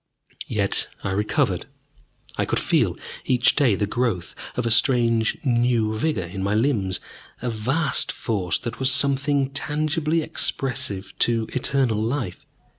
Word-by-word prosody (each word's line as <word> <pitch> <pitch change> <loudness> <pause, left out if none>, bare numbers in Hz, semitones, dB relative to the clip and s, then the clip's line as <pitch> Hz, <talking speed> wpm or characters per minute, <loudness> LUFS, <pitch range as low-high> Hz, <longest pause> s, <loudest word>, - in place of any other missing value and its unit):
Yet - - +1 0.2
I 95 - -2
recovered. 105 +2 0 0.7
I - - 0
could - - -1
feel - - +1 0.3
each 125 -1 +3
day 130 -8 +3
the 105 - 0
growth 110 -4 -2 0.2
of 125 - -1
a 115 - +1
strange 115 -1 +3
new 120 -3 +2
vigor 110 - -1
in 90 +3 -6
my 100 +2 0
limbs, 105 -6 +1 0.4
a 125 0 -2
vast 135 +8 +1
force 100 -6 -1
that 120 -1 -6
was 130 +1 +3
something 140 0 +2
tangibly 155 +3 -1
expressive 105 -10 -1
to 115 -2 +2
eternal 130 -4 0
life. 115 -5 -3
120 Hz, 135 wpm, -23 LUFS, 110-140 Hz, 0.7 s, each